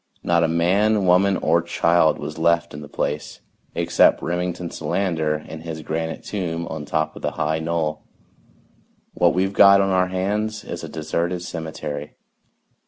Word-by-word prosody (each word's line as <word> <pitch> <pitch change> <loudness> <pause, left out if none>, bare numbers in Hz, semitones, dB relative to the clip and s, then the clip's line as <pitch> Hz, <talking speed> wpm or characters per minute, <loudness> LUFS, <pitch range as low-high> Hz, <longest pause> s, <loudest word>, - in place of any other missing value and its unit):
Not 85 -1 +2
a - - +3
man, 95 +5 +2
woman 95 +2 +4
or 85 +2 +2
child 85 -1 +2
was 75 +2 -6
left 85 +1 +2
in 75 - -7
the 75 - -9
place 75 +1 -3 0.4
except - - +3
Remington 90 0 -3
Solander 80 -6 -1
in 80 - -8
his 80 -1 -6
granite 80 +1 -3
tomb 85 -4 -3
on 80 -2 -5
top 80 +1 -1
of - - -10
the - - -2
high 80 +1 -1
knoll. 80 -2 -2 1.1
What - - +2
we've 95 +2 +1
got 100 0 +7
on 95 0 +2
our 90 0 +3
hands 105 +4 -2
is - - -7
a - - -6
deserted 85 +3 -2
cemetery. 80 -3 -6
85 Hz, 160 wpm, -22 LUFS, 80-90 Hz, 1.1 s, got